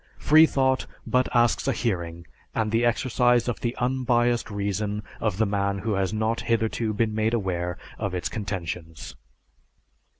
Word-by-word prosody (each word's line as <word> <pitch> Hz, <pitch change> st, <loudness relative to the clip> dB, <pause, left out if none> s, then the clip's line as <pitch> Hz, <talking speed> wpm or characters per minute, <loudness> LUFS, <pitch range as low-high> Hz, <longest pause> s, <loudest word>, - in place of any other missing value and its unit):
Freethought 140 Hz, -4 st, +4 dB, 0.2 s
but 125 Hz, 0 st, +1 dB
asks 120 Hz, -2 st, +2 dB
a -, -, +3 dB
hearing 85 Hz, -6 st, -3 dB, 0.3 s
and 110 Hz, -1 st, 0 dB
the 115 Hz, +2 st, +2 dB
exercise 120 Hz, 0 st, +2 dB
of 120 Hz, -, -2 dB
the 120 Hz, 0 st, -2 dB
unbiased 120 Hz, -1 st, +1 dB
reason 100 Hz, +1 st, -2 dB, 0.2 s
of 105 Hz, -5 st, -1 dB
the 110 Hz, -, +3 dB
man 100 Hz, -1 st, 0 dB
who 105 Hz, +3 st, -2 dB
has 95 Hz, -1 st, 0 dB
not 110 Hz, +1 st, -1 dB
hitherto 115 Hz, -1 st, 0 dB
been 110 Hz, +1 st, 0 dB
made 110 Hz, +2 st, +1 dB
aware 90 Hz, -4 st, -2 dB, 0.2 s
of 100 Hz, -4 st, -2 dB
its 90 Hz, -, -2 dB
contentions. 90 Hz, -6 st, -5 dB
110 Hz, 145 wpm, -25 LUFS, 100-120 Hz, 0.3 s, Freethought